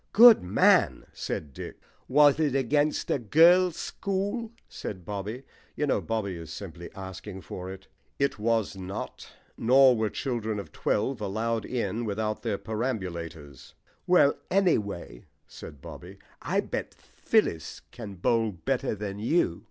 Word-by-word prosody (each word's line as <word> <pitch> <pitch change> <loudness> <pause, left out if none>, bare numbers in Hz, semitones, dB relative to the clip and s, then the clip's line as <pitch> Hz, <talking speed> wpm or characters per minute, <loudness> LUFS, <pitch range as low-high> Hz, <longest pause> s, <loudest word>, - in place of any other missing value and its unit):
"Good 235 0 +9
man," 90 +2 +3
said 75 -3 -5
Dick. - - -8 0.3
"Was 145 +2 +5
it 145 -4 +1
against 145 +3 +1
a - - +1
girls' 170 - +5
school?" 205 +4 -3 0.2
said 95 -4 -7
Bobby. 105 +6 -5 0.3
(You 150 - 0
know, 140 - +1
Bobby 105 -5 -2
is 80 -1 -9
simply 85 -1 -8
asking 95 +1 -8
for 90 +1 -7
it.) 95 0 -10 0.3
"It 140 -5 0
was 110 -2 0
not. 95 +2 -7 0.3
Nor 130 +2 +6
were 110 -1 0
children 110 -3 -3
of 100 - -7
twelve 110 +3 -1
allowed 110 +2 -1
in 115 -2 -2
without 110 0 -2
their 110 -4 -1
perambulators." 85 - -5 0.3
"Well, 175 -6 +5
anyhow," 105 - 0 0.3
said 70 - -11
Bobby, - - -10 0.2
"I - - 0
bet - - -5
Phyllis 80 -1 -1
can 105 -4 -8
bowl 110 +4 +1
better 120 +6 -1
than 100 -1 -5
you." 110 - +1
110 Hz, 135 wpm, -27 LUFS, 95-135 Hz, 0.3 s, Good